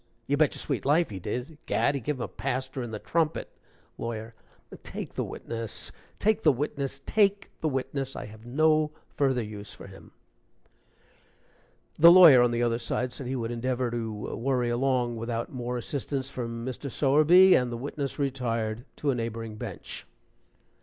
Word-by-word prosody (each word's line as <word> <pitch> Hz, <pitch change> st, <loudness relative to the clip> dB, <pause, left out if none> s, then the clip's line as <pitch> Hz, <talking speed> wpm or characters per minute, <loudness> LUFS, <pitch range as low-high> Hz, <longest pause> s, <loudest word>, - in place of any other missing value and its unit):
"You 140 Hz, -, +1 dB
bet 150 Hz, -1 st, +2 dB
your -, -, -7 dB
sweet -, -, -2 dB
life 150 Hz, +1 st, +3 dB
he 95 Hz, -, -5 dB
did. 125 Hz, -, -5 dB
Gad! 140 Hz, -, +2 dB
he 140 Hz, -, -3 dB
gave 150 Hz, +5 st, -1 dB
him 130 Hz, -, -7 dB
a -, -, -3 dB
paster 130 Hz, +1 st, -3 dB
in 120 Hz, -, -4 dB
the 110 Hz, -, -4 dB
trumpet 160 Hz, +7 st, -1 dB, 0.3 s
" -, -, -35 dB
LAWYER. 115 Hz, -1 st, -5 dB, 0.5 s
"Take -, -, -7 dB
the -, -, -2 dB
witness! 115 Hz, -3 st, -5 dB, 0.3 s
take 215 Hz, +1 st, +2 dB
the 155 Hz, -, +6 dB
witness! 140 Hz, 0 st, -3 dB
take 200 Hz, -1 st, +2 dB
the 155 Hz, -, +1 dB
witness! 135 Hz, 0 st, -3 dB
I -, -, -5 dB
have 110 Hz, +1 st, -12 dB
no 155 Hz, +5 st, +3 dB, 0.3 s
further 130 Hz, -4 st, +2 dB
use 105 Hz, -1 st, -7 dB
for -, -, -11 dB
him." 95 Hz, -1 st, -13 dB, 1.9 s
The 170 Hz, +2 st, +10 dB
lawyer 170 Hz, -8 st, +9 dB
on 120 Hz, -, +4 dB
the 120 Hz, 0 st, 0 dB
other 115 Hz, 0 st, +1 dB
side 125 Hz, +1 st, -2 dB
said 130 Hz, -, -6 dB
he 130 Hz, -, -2 dB
would 115 Hz, -2 st, -2 dB
endeavor 125 Hz, +1 st, -1 dB
to 115 Hz, -2 st, -3 dB, 0.2 s
worry 125 Hz, 0 st, 0 dB
along 120 Hz, -1 st, +1 dB
without 115 Hz, +2 st, -3 dB
more 125 Hz, -1 st, -3 dB
assistance 135 Hz, +1 st, -3 dB
from 115 Hz, -2 st, -5 dB
Mr. 130 Hz, +2 st, -4 dB
Sowerby, 155 Hz, +8 st, +6 dB
and 125 Hz, -1 st, +3 dB
the 120 Hz, -, -3 dB
witness 140 Hz, +2 st, -4 dB
retired 120 Hz, -4 st, -2 dB
to 145 Hz, -, 0 dB
a -, -, 0 dB
neighboring 115 Hz, -2 st, -4 dB
bench. -, -, -7 dB
130 Hz, 175 wpm, -28 LUFS, 115-145 Hz, 1.9 s, The